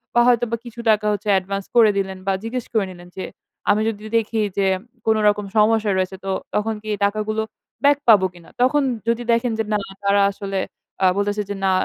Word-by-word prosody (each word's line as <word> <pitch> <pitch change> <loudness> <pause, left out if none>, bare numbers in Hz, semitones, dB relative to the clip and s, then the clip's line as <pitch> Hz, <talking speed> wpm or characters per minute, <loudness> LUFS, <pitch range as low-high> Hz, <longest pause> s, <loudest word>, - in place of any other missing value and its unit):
বা 240 - +6
হয়তোবা 240 -1 +2
কিছু 235 0 -10
টাকা 215 0 +1
হচ্ছে 205 +1 -5
অ্যাডভান্স 195 +1 -1
করে 230 -3 +7
দিলেন 190 -1 -2
বা 195 - +3
জিজ্ঞেস 235 +2 -4
করে 220 -3 +2
নিলেন 175 -1 -13
যে, 190 - -3 0.4
"আমি 210 +1 +4
যদি 210 -1 -6
দেখি 225 0 -1 0.2
যে 190 -1 +2 0.3
কোনো 220 0 +3
রকম 205 0 +2
সমস্যা 215 0 +3
রয়েছে 185 0 -1
তো, 195 - -1 0.2
তখন 220 +2 0
কি 215 - -12
এই 205 - -4
টাকাগুলো 215 +1 -1 0.4
ব্যাক 285 0 +5
পাবো 205 -5 +7
কিনা?" 175 -2 -16
তখন 260 +4 +4 0.3
যদি 235 +1 +1
দেখেন 235 +1 +2
যে 220 - 0
না - - +3 0.3
তারা 200 0 +3
আসলে 195 -1 -4 0.4
আ - - +6
বলতেছে 205 +1 0
যে 205 - -3
"না 190 - +3
210 Hz, 205 wpm, -21 LUFS, 195-225 Hz, 0.4 s, করে